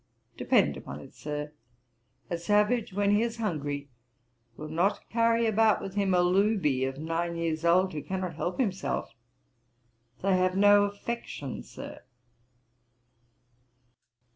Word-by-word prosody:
Depend -, -, +2 dB
upon -, -, -8 dB
it, -, -, -13 dB
Sir, 150 Hz, 0 st, -5 dB, 0.8 s
a -, -, -2 dB
savage, 210 Hz, +6 st, +1 dB
when 200 Hz, +1 st, +1 dB
he 205 Hz, +1 st, +4 dB
is 235 Hz, 0 st, -2 dB
hungry, 145 Hz, -9 st, -3 dB, 0.7 s
will 155 Hz, -, -6 dB
not 175 Hz, +6 st, 0 dB
carry 230 Hz, 0 st, +3 dB
about 220 Hz, 0 st, +3 dB
with 195 Hz, -, -6 dB
him 195 Hz, -2 st, +1 dB
a 180 Hz, -, +4 dB
looby 180 Hz, -8 st, +2 dB
of 135 Hz, 0 st, -4 dB
nine 165 Hz, +2 st, -2 dB
years 165 Hz, -1 st, -2 dB
old, 185 Hz, +2 st, +3 dB
who 150 Hz, -, -4 dB
cannot 185 Hz, 0 st, -4 dB
help 175 Hz, -, -3 dB
himself. 195 Hz, -7 st, -1 dB, 1.1 s
They 195 Hz, -1 st, +3 dB
have 185 Hz, 0 st, +1 dB
no 205 Hz, 0 st, +6 dB
affection, 205 Hz, -, -5 dB
Sir.' -, -, -10 dB
185 Hz, 130 wpm, -28 LUFS, 165-205 Hz, 1.1 s, no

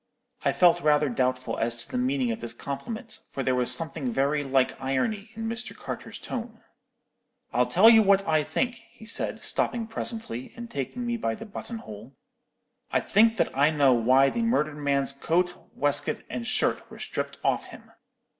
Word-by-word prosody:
"I -, -, +3 dB
felt 175 Hz, -1 st, +4 dB
rather 150 Hz, -1 st, +3 dB
doubtful 125 Hz, -1 st, -1 dB
as 115 Hz, +1 st, -1 dB
to -, -, -15 dB
the 125 Hz, -, -1 dB
meaning 130 Hz, -1 st, +1 dB
of 110 Hz, -, -4 dB
this 120 Hz, 0 st, -5 dB
compliment, 220 Hz, -, -6 dB
for 135 Hz, -, -4 dB
there 130 Hz, -, +1 dB
was 125 Hz, -1 st, +3 dB
something 150 Hz, 0 st, -1 dB
very 140 Hz, +4 st, +1 dB
like 135 Hz, -1 st, +1 dB
irony 200 Hz, -, -1 dB
in 225 Hz, 0 st, -4 dB
Mr. 230 Hz, +2 st, -5 dB
Carter's -, -, -7 dB
tone. 230 Hz, -2 st, -6 dB, 0.9 s
"'I'll -, -, +3 dB
tell -, -, +6 dB
you 225 Hz, -1 st, +9 dB
what 195 Hz, -1 st, +3 dB
I 155 Hz, -1 st, +3 dB
think,' 245 Hz, -, -2 dB
he 235 Hz, -1 st, -15 dB
said, 230 Hz, -, -1 dB
stopping 235 Hz, -2 st, 0 dB
presently, 220 Hz, -, -4 dB
and 235 Hz, 0 st, -8 dB
taking 140 Hz, -, -4 dB
me 235 Hz, 0 st, -1 dB
by 115 Hz, -, -1 dB
the -, -, -9 dB
button 230 Hz, +2 st, -7 dB
hole. 110 Hz, -, -11 dB, 0.7 s
'I -, -, +2 dB
think 225 Hz, +2 st, +4 dB
that -, -, 0 dB
I 140 Hz, +2 st, +4 dB
know 145 Hz, -4 st, +4 dB
why 130 Hz, +4 st, +4 dB
the 235 Hz, -, -2 dB
murdered 155 Hz, -11 st, +1 dB
man's 140 Hz, -1 st, +1 dB
coat, 175 Hz, +6 st, 0 dB, 0.2 s
waistcoat, 145 Hz, 0 st, 0 dB
and 120 Hz, -2 st, -4 dB
shirt -, -, 0 dB
were -, -, -11 dB
stripped -, -, -4 dB
off -, -, +1 dB
him.' -, -, -14 dB
145 Hz, 185 wpm, -27 LUFS, -, 0.9 s, you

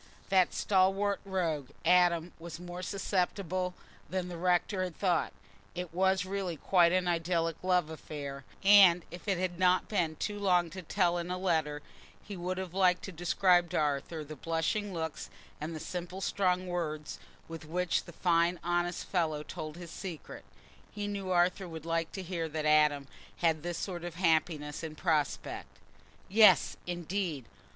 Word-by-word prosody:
That 190 Hz, -2 st, +4 dB
stalwart 195 Hz, +1 st, +2 dB
rogue 165 Hz, -8 st, -1 dB, 0.2 s
Adam 175 Hz, -1 st, +4 dB
was 165 Hz, -1 st, -8 dB
more 175 Hz, 0 st, -7 dB
susceptible 185 Hz, -1 st, -1 dB, 0.3 s
than 185 Hz, -1 st, -2 dB
the 175 Hz, -, -6 dB
rector 180 Hz, +2 st, +1 dB
had 180 Hz, -3 st, -5 dB
thought; 180 Hz, -4 st, +1 dB, 0.4 s
it 180 Hz, -2 st, -5 dB
was 190 Hz, +1 st, +2 dB
really 190 Hz, -3 st, -3 dB
quite 175 Hz, +1 st, +4 dB
an 185 Hz, 0 st, +1 dB
idyllic 165 Hz, -1 st, 0 dB
love 180 Hz, -3 st, +2 dB
affair; 140 Hz, -3 st, -7 dB, 0.2 s
and 195 Hz, -4 st, +7 dB
if 175 Hz, +4 st, -10 dB
it 195 Hz, -3 st, +1 dB
had 180 Hz, -1 st, -2 dB
not 185 Hz, 0 st, +3 dB
been 175 Hz, -7 st, 0 dB
too 205 Hz, +5 st, -3 dB
long 180 Hz, -4 st, +2 dB
to 185 Hz, +2 st, -7 dB
tell 175 Hz, 0 st, +1 dB
in 170 Hz, +1 st, -5 dB
a 180 Hz, -, -2 dB
letter, 160 Hz, -5 st, 0 dB, 0.4 s
he 205 Hz, -, -7 dB
would 180 Hz, +1 st, -3 dB
have 185 Hz, -2 st, -5 dB
liked 185 Hz, -2 st, +3 dB
to 195 Hz, -, -6 dB
describe 175 Hz, +1 st, +3 dB
to -, -, -2 dB
Arthur 150 Hz, +2 st, -1 dB
the 155 Hz, +1 st, -9 dB
blushing 165 Hz, -, -1 dB
looks 160 Hz, -3 st, -4 dB, 0.3 s
and 160 Hz, +2 st, -4 dB
the -, -, -5 dB
simple 180 Hz, +3 st, -5 dB
strong 185 Hz, -2 st, +1 dB
words 155 Hz, -4 st, -4 dB, 0.3 s
with 165 Hz, -1 st, -8 dB
which 175 Hz, +2 st, 0 dB
the -, -, -10 dB
fine 170 Hz, 0 st, +2 dB
honest 175 Hz, 0 st, -1 dB
fellow 160 Hz, -5 st, -1 dB
told 155 Hz, 0 st, -7 dB
his 175 Hz, -2 st, -9 dB
secret. 175 Hz, -5 st, -7 dB, 0.5 s
He 205 Hz, -1 st, -4 dB
knew 200 Hz, -2 st, -4 dB
Arthur 180 Hz, +1 st, +2 dB
would 160 Hz, -2 st, -8 dB
like 165 Hz, 0 st, -1 dB
to 190 Hz, -, -5 dB
hear 170 Hz, -3 st, -3 dB
that 155 Hz, 0 st, -3 dB
Adam 150 Hz, -2 st, +4 dB, 0.3 s
had 160 Hz, -2 st, +1 dB
this 175 Hz, +1 st, -4 dB
sort 175 Hz, -3 st, -4 dB
of 175 Hz, -2 st, -6 dB
happiness 160 Hz, -4 st, +1 dB
in 160 Hz, -1 st, -6 dB
prospect. 155 Hz, -3 st, -1 dB, 0.5 s
Yes, 215 Hz, +2 st, +6 dB
indeed! 175 Hz, -, -3 dB
175 Hz, 165 wpm, -31 LUFS, 160-185 Hz, 0.5 s, and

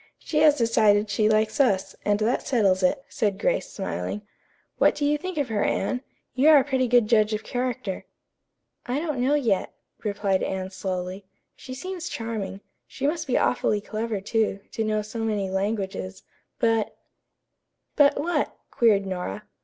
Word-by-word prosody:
She 305 Hz, -, -2 dB
has 300 Hz, -1 st, +6 dB
decided 215 Hz, -3 st, +3 dB
she 215 Hz, +1 st, +2 dB
likes 215 Hz, +4 st, +1 dB
us, 200 Hz, -9 st, +2 dB
and 205 Hz, 0 st, +2 dB
that 230 Hz, +4 st, 0 dB
settles 200 Hz, -7 st, +3 dB
it," 270 Hz, +10 st, +1 dB
said 205 Hz, -3 st, -1 dB
Grace, -, -, 0 dB
smiling. 210 Hz, -, -4 dB, 0.6 s
"What -, -, +4 dB
do 290 Hz, -, -1 dB
you 295 Hz, +1 st, +3 dB
think 370 Hz, +3 st, -5 dB
of 285 Hz, -4 st, 0 dB
her, 210 Hz, -2 st, 0 dB
Anne? 250 Hz, +5 st, 0 dB, 0.3 s
You 275 Hz, +4 st, +4 dB
are 310 Hz, -, +9 dB
a 275 Hz, -, +5 dB
pretty 260 Hz, -2 st, 0 dB
good 240 Hz, -1 st, +4 dB
judge 215 Hz, -1 st, +3 dB
of 210 Hz, -, -5 dB
character." 245 Hz, -6 st, -3 dB, 0.8 s
"I 250 Hz, +3 st, 0 dB
don't 305 Hz, -5 st, -2 dB
know 270 Hz, +4 st, +3 dB
yet," 230 Hz, -10 st, 0 dB, 0.3 s
replied 200 Hz, -2 st, 0 dB
Anne 190 Hz, 0 st, -3 dB
slowly. 185 Hz, 0 st, -4 dB, 0.3 s
"She 255 Hz, -, -9 dB
seems 360 Hz, +4 st, -5 dB
charming. 210 Hz, -4 st, -4 dB, 0.3 s
She 275 Hz, -, -5 dB
must 320 Hz, +2 st, -1 dB
be 255 Hz, -, +2 dB
awfully 210 Hz, -4 st, +1 dB
clever, 215 Hz, 0 st, -3 dB
too, 215 Hz, -1 st, 0 dB
to 225 Hz, -, -2 dB
know 215 Hz, -1 st, 0 dB
so 215 Hz, +2 st, -7 dB
many 210 Hz, -4 st, -1 dB
languages, 195 Hz, -1 st, -3 dB, 0.3 s
but 225 Hz, -2 st, +1 dB, 0.5 s
" -, -, -54 dB
"But 285 Hz, -1 st, +5 dB
what?" 340 Hz, +4 st, -1 dB
queried 210 Hz, -4 st, +3 dB
Nora. 180 Hz, -, -4 dB
220 Hz, 170 wpm, -25 LUFS, 200-260 Hz, 0.8 s, are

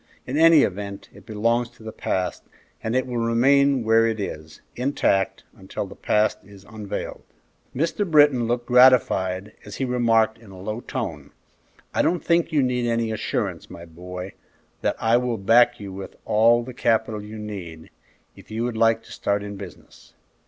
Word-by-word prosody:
In 130 Hz, -, -4 dB
any 160 Hz, -1 st, +6 dB
event, 100 Hz, +1 st, -4 dB
it -, -, -17 dB
belongs 115 Hz, +2 st, 0 dB
to 110 Hz, -, -19 dB
the 110 Hz, -, -6 dB
past, 95 Hz, -3 st, -2 dB, 0.4 s
and 110 Hz, +2 st, -2 dB
it 130 Hz, -, +1 dB
will 125 Hz, -2 st, -4 dB
remain 135 Hz, +3 st, +3 dB
where 115 Hz, +1 st, +4 dB
it 110 Hz, -1 st, -2 dB
is, 80 Hz, -5 st, -7 dB
intact, 125 Hz, -7 st, 0 dB
until 95 Hz, +1 st, -6 dB
the 100 Hz, -, -11 dB
past 105 Hz, 0 st, +1 dB
is 100 Hz, -1 st, -15 dB
unveiled." 105 Hz, -2 st, -6 dB, 0.5 s
Mr. 170 Hz, +7 st, -1 dB
Britton 145 Hz, -6 st, +5 dB
looked 120 Hz, 0 st, -1 dB
gratified, 110 Hz, -7 st, +4 dB
as 105 Hz, -, -9 dB
he 135 Hz, -, -2 dB
remarked, 115 Hz, -3 st, +2 dB
in 110 Hz, -3 st, -16 dB
a 95 Hz, -1 st, -12 dB
low 105 Hz, +4 st, -4 dB
tone, 75 Hz, -, -5 dB, 0.6 s
"I -, -, +2 dB
don't 175 Hz, -, 0 dB
think 170 Hz, 0 st, +2 dB
you 150 Hz, -3 st, +2 dB
need 125 Hz, -1 st, 0 dB
any 115 Hz, -1 st, 0 dB
assurance, 110 Hz, -, -3 dB
my 85 Hz, -, -10 dB
boy, 90 Hz, +3 st, -8 dB, 0.5 s
that -, -, 0 dB
I 115 Hz, +1 st, +3 dB
will 120 Hz, -2 st, -1 dB
back 120 Hz, +4 st, +4 dB
you 100 Hz, -2 st, -8 dB
with 95 Hz, 0 st, -8 dB
all 115 Hz, +2 st, +4 dB
the 130 Hz, +1 st, -9 dB
capital 110 Hz, -2 st, 0 dB
you 105 Hz, +1 st, -9 dB
need, 95 Hz, -7 st, -8 dB, 0.4 s
if -, -, -16 dB
you 110 Hz, +2 st, -3 dB
would 120 Hz, -2 st, -3 dB
like 115 Hz, 0 st, +3 dB
to -, -, -16 dB
start 100 Hz, 0 st, -1 dB
in 100 Hz, 0 st, -7 dB
business." 100 Hz, -2 st, -13 dB
115 Hz, 175 wpm, -23 LUFS, 100-125 Hz, 0.6 s, any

